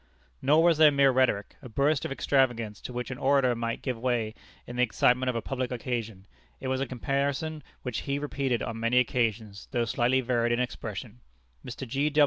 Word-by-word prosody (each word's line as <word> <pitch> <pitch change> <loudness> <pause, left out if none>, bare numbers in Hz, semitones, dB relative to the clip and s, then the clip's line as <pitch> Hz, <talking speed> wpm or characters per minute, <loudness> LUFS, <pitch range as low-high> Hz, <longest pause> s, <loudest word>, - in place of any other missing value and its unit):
Nor 150 +4 +4
was 170 -2 +4
this 155 -1 +8
mere 140 -1 +4
rhetoric, 125 -6 +1
a 125 - -10
burst 140 +5 +1
of - - -4
extravagance, 120 -6 +1
to - - -7
which 125 +1 -4
an 130 - -6
orator 135 -2 +3
might 115 0 -3
give 125 -4 -2
way 120 -3 0 0.3
in 120 - -8
the 125 - +1
excitement 125 +2 +3
of 125 - -1
a 115 - -2
public 130 -2 -3
occasion; 115 -5 -4 0.3
it 130 - -4
was 130 0 0
a 135 - -1
comparison 140 +5 -2 0.2
which 125 -3 -3
he 140 0 -2
repeated 140 -4 -1
on 115 0 -4
many 115 +2 +1
occasions, 110 -4 0
though 120 -3 0
slightly 120 +2 +2
varied 120 -2 +1
in 120 - 0
expression. 120 -1 -5 0.4
Mr. 125 +1 -7
125 Hz, 190 wpm, -28 LUFS, 115-135 Hz, 0.4 s, this